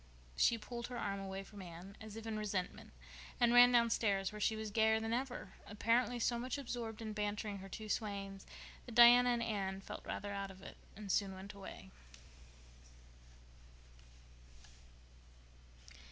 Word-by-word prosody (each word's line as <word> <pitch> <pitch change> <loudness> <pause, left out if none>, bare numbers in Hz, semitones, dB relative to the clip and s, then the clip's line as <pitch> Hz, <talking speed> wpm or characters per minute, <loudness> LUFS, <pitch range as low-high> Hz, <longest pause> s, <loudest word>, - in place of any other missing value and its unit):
She 235 - +4
pulled 235 +2 -6
her 250 - -6
arm 200 -3 -2
away 195 0 -5
from 200 0 -11
Anne, 180 +2 -10
as 220 -1 -9
if 225 0 -7
in 225 -1 -3
resentment, 205 -4 -3 0.5
and 240 0 +4
ran 245 0 +9
downstairs, 220 -5 +2
where 210 0 -8
she 220 - +2
was 220 -1 -5
gayer 220 +1 +3
than 225 +1 -2
ever, 250 -6 -3
apparently 235 +4 +1
so 235 0 +1
much 255 +3 -3
absorbed 235 -4 -5
in 215 -1 -4
bantering 210 -1 -3
her 195 +1 -9
two 215 +2 -7
swains 200 -2 -3 0.4
that 235 - -8
Diana 245 +1 +9
and 240 -1 +1
Anne 195 -4 -2
felt 195 - -8
rather 205 0 -4
out 200 0 -3
of 190 0 -13
it - - -10 0.2
and 205 -1 -5
soon 195 -1 +1
went 195 +2 -9
away. 200 -1 -10
215 Hz, 155 wpm, -36 LUFS, 195-235 Hz, 0.5 s, ran